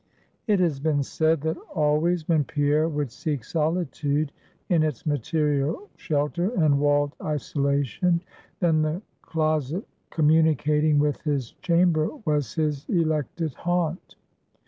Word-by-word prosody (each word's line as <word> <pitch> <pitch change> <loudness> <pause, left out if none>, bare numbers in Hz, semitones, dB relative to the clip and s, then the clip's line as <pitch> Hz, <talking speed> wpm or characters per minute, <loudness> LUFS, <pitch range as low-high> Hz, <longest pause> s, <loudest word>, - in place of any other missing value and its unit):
It 205 -3 +3
has 165 -6 +1
been 145 -1 +1
said, 160 +2 +1
that 160 +1 -1 0.2
always 155 +2 +1
when 160 -3 +3
Pierre 150 +3 +1
would 145 -5 -2
seek 145 -2 -3
solitude 155 -1 -1 0.4
in 170 -4 +3
its 155 -6 -2
material 150 - 0
shelter 155 +4 -1
and 150 -4 +3
walled 145 0 +2
isolation, 145 +3 0 0.4
then 160 -3 +3
the 155 +6 -1 0.2
closet 155 - -1 0.2
communicating 155 -1 +3
with 145 0 +1
his 140 -6 -2
chamber 170 -3 +3 0.2
was 150 -6 0
his 150 -3 -1
elected 160 -2 0
haunt. 175 +1 -2
155 Hz, 120 wpm, -25 LUFS, 145-165 Hz, 0.4 s, It